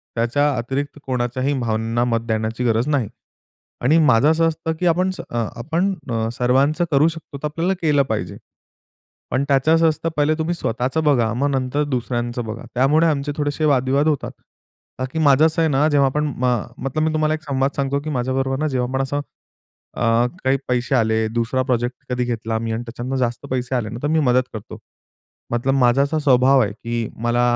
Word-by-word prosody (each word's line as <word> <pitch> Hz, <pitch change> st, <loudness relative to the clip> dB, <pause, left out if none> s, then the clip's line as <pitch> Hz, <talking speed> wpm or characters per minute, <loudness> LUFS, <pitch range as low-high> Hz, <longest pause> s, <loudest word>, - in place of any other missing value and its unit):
त्याच्या 130 Hz, +6 st, +1 dB
अतिरिक्त 135 Hz, +5 st, -3 dB
कोणाच्याही 130 Hz, +2 st, -1 dB
भावनांना 115 Hz, 0 st, 0 dB
मत 115 Hz, -2 st, -1 dB
देण्याची 110 Hz, +2 st, -1 dB
गरज 115 Hz, +2 st, +1 dB
नाही. 140 Hz, -7 st, +1 dB, 0.7 s
आणि 145 Hz, +7 st, +4 dB
माझं 145 Hz, -3 st, +4 dB
असं 165 Hz, +1 st, +3 dB
असतं 160 Hz, 0 st, -2 dB
की 180 Hz, -, -1 dB
आपण 180 Hz, +3 st, +2 dB
स 185 Hz, -, -7 dB
अ 115 Hz, -1 st, -1 dB
आपण 170 Hz, +10 st, 0 dB, 0.2 s
अ, 115 Hz, -1 st, 0 dB
सर्वांचं 135 Hz, +7 st, +2 dB
करू 145 Hz, +2 st, +4 dB
शकतो 165 Hz, -3 st, -6 dB
तर 145 Hz, -, -6 dB
आपल्याला 165 Hz, +5 st, -1 dB
केलं 150 Hz, -4 st, +3 dB
पाहिजे. 110 Hz, -1 st, -3 dB, 0.9 s
पण 130 Hz, -, +1 dB
त्याचं 140 Hz, +3 st, +3 dB
असं 165 Hz, 0 st, +4 dB
असतं 160 Hz, +1 st, -2 dB
पहिले 150 Hz, +1 st, +3 dB
तुम्ही 160 Hz, +2 st, -1 dB
स्वतःचं 130 Hz, +1 st, -1 dB
बघा, 125 Hz, -7 st, +2 dB
मग 140 Hz, +4 st, 0 dB
नंतर 135 Hz, +1 st, 0 dB
दुसऱ्यांचं 120 Hz, -3 st, -2 dB
बघा. 110 Hz, +1 st, -6 dB
त्यामुळे 145 Hz, +6 st, +4 dB
आमचे 145 Hz, -2 st, 0 dB
थोडेसे 145 Hz, +1 st, -1 dB
वाद-विवाद 140 Hz, +1 st, +2 dB
होतात. 150 Hz, -3 st, 0 dB, 0.7 s
का 130 Hz, -, -1 dB
की 160 Hz, -, -1 dB
माझं 145 Hz, -1 st, +5 dB
असं 160 Hz, +1 st, +1 dB
आहे 160 Hz, -, +3 dB
ना 145 Hz, +3 st, +3 dB
जेव्हा 140 Hz, -2 st, +3 dB
आपण 150 Hz, +3 st, -1 dB
म 125 Hz, -, -1 dB, 0.4 s
मतलब 145 Hz, +4 st, -1 dB
मी 160 Hz, 0 st, +1 dB
तुम्हाला 155 Hz, 0 st, +1 dB
एक 155 Hz, -, -4 dB
संवाद 135 Hz, -2 st, 0 dB
सांगतो 140 Hz, 0 st, 0 dB
की 155 Hz, -, -5 dB
माझ्याबरोबर 135 Hz, 0 st, -1 dB
ना 155 Hz, -, 0 dB
जेव्हा 125 Hz, -3 st, -1 dB
आपण 130 Hz, +1 st, -1 dB
असं 145 Hz, +2 st, -2 dB, 0.7 s
अ, -, -, -5 dB, 0.4 s
काही 130 Hz, +1 st, +2 dB
पैसे 125 Hz, +1 st, 0 dB
आले, 110 Hz, -2 st, +2 dB
दुसरा 115 Hz, +3 st, -1 dB
प्रोजेक्ट 125 Hz, -1 st, -1 dB
कधी 125 Hz, 0 st, 0 dB
घेतला 115 Hz, -2 st, -2 dB
मी 115 Hz, 0 st, -3 dB
आणि 115 Hz, +2 st, -3 dB
त्याच्यतनं 120 Hz, +2 st, -5 dB
जास्त 120 Hz, +1 st, -2 dB
पैसे 130 Hz, 0 st, -1 dB
आले 115 Hz, -4 st, -1 dB
ना 115 Hz, +2 st, -6 dB
तर -, -, +1 dB
मी 160 Hz, +1 st, +2 dB
मदत 130 Hz, -3 st, +3 dB
करतो. 110 Hz, -2 st, -8 dB, 0.7 s
मतलब 120 Hz, +3 st, +1 dB
माझा 125 Hz, 0 st, +4 dB
असा 155 Hz, +3 st, -1 dB
स्वभाव 135 Hz, -1 st, +4 dB
आहे 105 Hz, -3 st, 0 dB
की 115 Hz, 0 st, -4 dB
मला 120 Hz, +1 st, +2 dB
135 Hz, 195 wpm, -21 LUFS, 120-150 Hz, 0.9 s, माझं